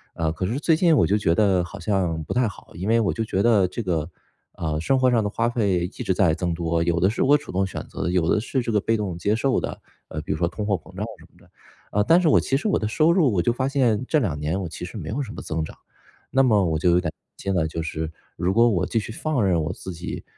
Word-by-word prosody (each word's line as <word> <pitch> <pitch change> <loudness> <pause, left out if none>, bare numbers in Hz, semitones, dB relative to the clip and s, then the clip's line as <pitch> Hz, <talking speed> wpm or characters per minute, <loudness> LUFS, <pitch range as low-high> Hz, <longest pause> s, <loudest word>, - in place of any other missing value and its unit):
呃， 80 -1 0
可 90 +3 -3
是 120 +8 -2
最 160 +1 +3
近 165 -1 +4
我 - - +4
就 100 - +2
觉 85 -5 +1
得 95 -4 +3
好 100 +3 -9
像 90 -6 -1
不 - - -3
太 125 -1 +2
好， 100 - -10
因 95 +4 -4
为 115 0 +4
我 105 - +1
就 115 - -2
觉 100 -2 0
得 105 -6 +4
这 115 +6 -5
个， 85 -3 -1 0.4
呃， 80 -2 -2
生 135 +8 +2
活 130 -1 +4
上 115 -3 +3
的 105 - -1
花 115 +3 0
费 100 -7 +1
一 - - -2 0.2
直 100 - 0
在 90 -4 +3
增 90 -2 -1
多， 85 0 0
有 85 0 +1
的 95 - +4
是 115 - -2
我 145 +2 +5
主 145 - -10
动 95 +1 +1
选 - - -6
择 - - -7
的， 85 - 0
有 90 -3 +1
的 - - +3
是 130 +3 -1
这 115 - -2
个 105 -2 +2
被 115 - +1
动 100 -5 -3
接 100 +5 +1
受 130 +3 +1
的， - - -5 0.3
呃， 80 - -5
比 - - -5
如 75 - -3
说 85 - +2
通 100 +4 -4
货 100 - +1
膨 80 - -11
胀 - - -3
什 - - -16
么 - - -26
的， - - -23 0.4
呃， 105 - +2
但 165 +11 +5
是 170 - +2
我 - - +5
其 135 - 0
实 215 - -2
我 200 - +2
的 110 - -1
收 155 +8 +3
入 160 - +3
我 95 - +1
就 120 - +1
发 130 +2 -1
现， 125 -6 +2
这 155 - +2
两 85 - -1
年 80 +6 -1
我 90 - -3
其 85 - -7
实 90 - -8
没 80 -6 -6
有 135 +7 -2
什 110 - -8
么 - - -7
增 80 0 -2
长。 - - -12 0.5
那 135 - +4
么 105 -6 +4
我 80 -2 0
就 90 - +2
有 85 - +4
点 - - -4
担 - - -40 0.2
心 95 - -2
了， 80 -3 +1
就 80 +1 -4
是 80 0 -4 0.3
如 90 +3 0
果 115 +1 +6
我 90 -5 +1
继 - - -2
续 110 - -6
放 125 -2 -1
任 85 -3 +2
我 85 - -2
自 95 -2 -8
己 85 +2 -6
100 Hz, 325 characters per minute, -24 LUFS, 85-115 Hz, 0.5 s, 果